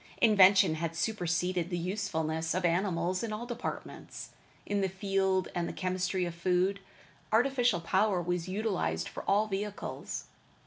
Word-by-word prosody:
Invention 195 -5 +6
had 165 +1 -3
superceded 180 -3 -1
the 175 - -2
usefulness 165 -4 -2
of 185 -1 0
animals 180 +1 +1
in 230 -2 -3
all 215 +3 -4
departments: 240 0 -6 0.4
in 205 -1 0
the 190 - +1
field 190 -1 0
and 175 -1 -1
the - - -5
chemistry 185 0 -1
of 175 - -4
food. 185 +3 +1 0.5
Artificial 245 -4 +3
power 190 +3 +2
was 175 0 -2
utilized 185 - -1
for - - -7
all 205 +2 +4
vehicles. 205 0 -4
185 Hz, 140 wpm, -31 LUFS, 175-205 Hz, 0.5 s, Invention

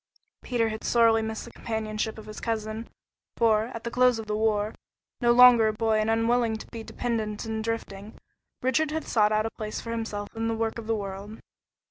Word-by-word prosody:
Peter 235 -3 0
had 220 0 -6
sorely 230 -1 +4
missed 220 0 -4
the 235 - -11
companionship 220 -1 -3
of 220 - -10
his 215 0 -8
cousin, 220 0 -3 0.5
for, 220 -2 +3
at 230 -1 -8
the 235 - -4
close 250 -1 +4
of 225 - -5
the 210 0 -2
war, 215 -1 +1 0.5
no 240 0 +4
longer 240 -2 +8
a 215 - +1
boy 220 0 +1
and 215 +1 0
unwilling 225 0 +2
to - - -10
be 230 - -6
dependent 220 -2 -3
and 220 0 -3
drifting, 220 -2 -5 0.5
Richard 275 +5 +2
had 315 +1 -3
sought 215 -2 +3
out 215 0 +2
a 225 - -2
place 215 -1 -5
for 230 - -6
himself 225 -2 -4
in 225 0 -1
the 225 - 0
work 225 +1 -2
of 220 - -9
the 225 - +1
world. 200 +1 -6
225 Hz, 205 wpm, -27 LUFS, 215-230 Hz, 0.5 s, longer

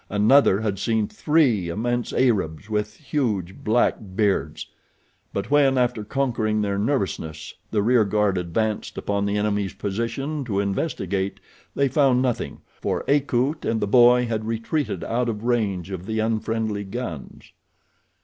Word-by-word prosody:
Another 105 0 +4
had 100 -3 -2
seen 110 0 +1
THREE 130 - +2
immense 120 +6 -1
Arabs 105 - 0
with 105 0 -2
huge, 110 - -2
black 110 +3 +2 0.2
beards; 100 -1 0 0.7
but - - -4
when, 140 -2 +4
after 125 -3 +1
conquering 115 -3 0
their 100 -1 -1
nervousness, 100 - -2 0.2
the 105 -2 +1
rear 120 0 +4
guard 105 -1 +1
advanced 100 +5 -2
upon 100 0 -1
the 100 +1 0
enemy's 105 -2 -1
position 115 +9 -3
to 100 -5 -1
investigate 100 - -2 0.4
they 140 - +2
found 135 -2 +3
nothing, 125 -2 -2 0.2
for - - -1
Akut 140 +1 +1
and 115 - 0
the - - 0
boy 120 +3 +5
had 110 -2 -2
retreated 115 +7 -2
out 120 +1 -1
of 105 -1 -4
range 100 -7 0
of 95 0 -6
the 110 0 -2
unfriendly 110 -1 -1
guns. 95 - -7
110 Hz, 140 wpm, -23 LUFS, 100-125 Hz, 0.7 s, boy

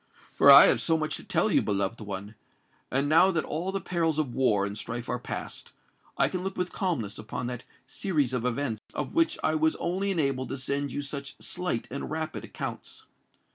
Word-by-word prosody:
For - - +5
I - - +12
have - - +3
so 165 - +2
much 155 -1 -2
to - - -11
tell - - +1
you, - - +4
beloved 100 +2 -1
one; 100 0 -6 0.6
and 135 +2 +1
now 165 +5 +6
that 165 -4 0
all 170 +5 -3
the 195 - -2
perils 165 -4 0
of 145 -6 -1
war 105 -7 +2
and 100 0 -4
strife 115 +2 -5
are 125 - -2
past, - - -6 0.4
I - - +4
can 185 - -3
look 190 0 -4
with 180 0 -2
calmness 135 - -2
upon 110 +2 -5
that 125 0 -5 0.2
series 150 -10 -1
of 125 -2 -1
events 125 -3 -1
of - - -3
which 330 0 +2
I 155 - +2
was 160 0 +2
only 190 +3 -1
enabled 140 -8 0
to 135 - -3
send 140 +2 -2
you 145 - -3
such 140 0 -6
slight 180 -11 -3
and 140 - -4
rapid 160 0 -4
accounts. - - -7
140 Hz, 205 wpm, -28 LUFS, 120-165 Hz, 0.6 s, I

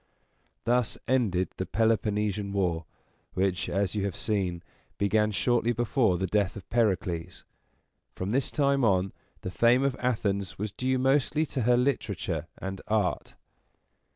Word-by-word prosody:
Thus 120 0 +1
ended 100 -9 +1
the - - -2
Peloponnesian 105 -1 0
War, 85 -5 0 0.5
which, 95 -1 0
as 100 0 0
you 105 -2 -1
have 95 -3 -3
seen, 95 -6 -1 0.3
began 105 +2 +2
shortly 120 +3 +1
before 115 -4 +2
the 95 - -1
death 100 +1 0
of 100 - -9
Pericles. 95 -7 0 0.7
From 95 +2 -3
this 130 +2 +1
time 140 -2 +2
on, 95 -3 +2 0.3
the 95 - -5
fame 120 +6 +4
of 135 -2 +1
Athens 100 -6 -1
was 105 +1 -3
due 130 +5 0
mostly 135 +4 +2
to 135 -3 -3
her 120 - +5
literature 100 - -1
and 95 0 -5
art. 105 -4 0
105 Hz, 140 wpm, -28 LUFS, 95-120 Hz, 0.7 s, her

